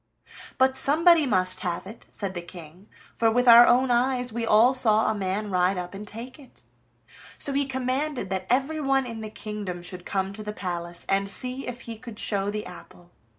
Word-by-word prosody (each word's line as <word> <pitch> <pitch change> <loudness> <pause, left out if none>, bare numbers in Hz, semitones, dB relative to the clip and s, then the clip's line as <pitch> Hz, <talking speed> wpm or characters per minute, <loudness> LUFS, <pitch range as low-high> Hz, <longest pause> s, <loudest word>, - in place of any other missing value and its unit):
"But 260 0 +3
somebody 315 +3 +4
must 185 -4 +2
have 175 0 -3
it," 215 +4 -12
said 195 -2 -5
the 175 - -5
King, 175 +2 -13 0.3
"for 225 - +2
with 245 +2 +1
our 235 0 +9
own 250 +1 +3
eyes 245 0 0
we 230 0 -3
all 225 +5 +5
saw 220 -4 +3
a 220 - +1
man 200 +1 -3
ride 180 +1 +1
up 180 +1 -5
and 205 +2 -8
take 240 +7 -9
it." 270 - -16 0.7
So 280 - +1
he 280 0 0
commanded 260 -3 -2
that 190 -1 -3
everyone 270 +1 +1
in 230 -2 -7
the 215 - -6
kingdom 205 -5 -6
should 180 0 -4
come 195 +1 -2
to 215 - -8
the 210 0 -5
palace, 175 -3 -5
and 195 0 0
see 255 +6 -2
if 250 0 -6
he 230 -2 -8
could 230 -2 -10
show 200 -2 -1
the 210 0 -4
apple. 175 -1 -13
215 Hz, 195 wpm, -25 LUFS, 190-255 Hz, 0.7 s, our